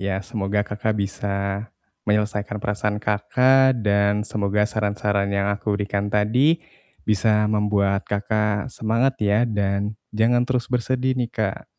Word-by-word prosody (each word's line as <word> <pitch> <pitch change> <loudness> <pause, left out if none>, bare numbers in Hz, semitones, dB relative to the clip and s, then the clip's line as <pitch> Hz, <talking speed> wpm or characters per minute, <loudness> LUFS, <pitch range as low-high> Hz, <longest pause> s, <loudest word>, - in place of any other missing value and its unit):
Ya, 95 -1 -1
semoga 105 -1 -2
Kakak 105 +1 -2
bisa 100 0 -3 0.7
menyelesaikan 105 0 0
perasaan 105 0 -1
Kakak 125 +5 +3
dan 100 0 +2
semoga 105 0 0
saran-saran 105 -2 0
yang 100 0 0
aku 105 +1 -2
berikan 100 0 -2
tadi 125 +11 +3 0.5
bisa 105 0 +2
membuat 105 -1 +1
Kakak 105 +2 -1
semangat 120 +3 0
ya. 105 +3 +3
Dan 100 0 -1 0.2
jangan 120 +3 +2
terus 125 -1 -1
bersedih 130 +1 0
nih, 120 -2 -1
Kak. 110 -6 -2
105 Hz, 125 wpm, -23 LUFS, 100-115 Hz, 0.7 s, Kakak